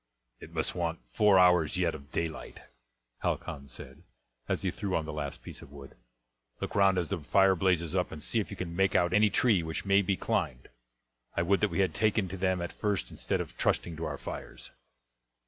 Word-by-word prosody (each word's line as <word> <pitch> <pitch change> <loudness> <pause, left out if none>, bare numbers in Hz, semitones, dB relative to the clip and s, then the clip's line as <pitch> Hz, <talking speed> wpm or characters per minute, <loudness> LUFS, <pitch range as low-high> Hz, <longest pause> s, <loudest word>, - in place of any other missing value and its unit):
"It - - -11
must - - -1
want 85 -2 -2
four 105 -3 +5
hours 90 -3 +5
yet 90 -2 +1
of 70 0 -11
daylight," 80 -2 -4 0.6
Halcon 70 -1 -3
said, - - -10 0.5
as - - 0
he - - +1
threw 100 -2 -3
on 80 - 0
the 80 - -5
last 75 -2 -5
piece - - -9
of 70 - -13
wood. 70 -1 -11 0.7
"Look - - -4
round 95 -2 +4
as 85 -3 -1
the - - -1
fire 95 +5 +4
blazes 85 -2 +1
up 90 -1 0
and 75 -2 -7
see 115 - 0
if 105 - -3
you 100 - -7
can 85 -2 -5
make 95 +1 +2
out 90 -1 +3
any 105 0 +5
tree 105 -4 +3
which 80 +3 -4
may 100 0 +5
be 100 -1 0
climbed. 65 0 -2 0.7
I 85 - +3
would 95 +3 +3
that 105 - +2
we 100 - 0
had 90 -5 +1
taken 110 +1 +2
to 95 - -5
them 95 -1 0
at 85 - -5
first 105 -3 -2
instead - - -2
of - - -8
trusting 85 - 0
to 80 - -3
our 75 -2 -4
fires." - - -8
90 Hz, 215 wpm, -30 LUFS, 80-95 Hz, 0.7 s, four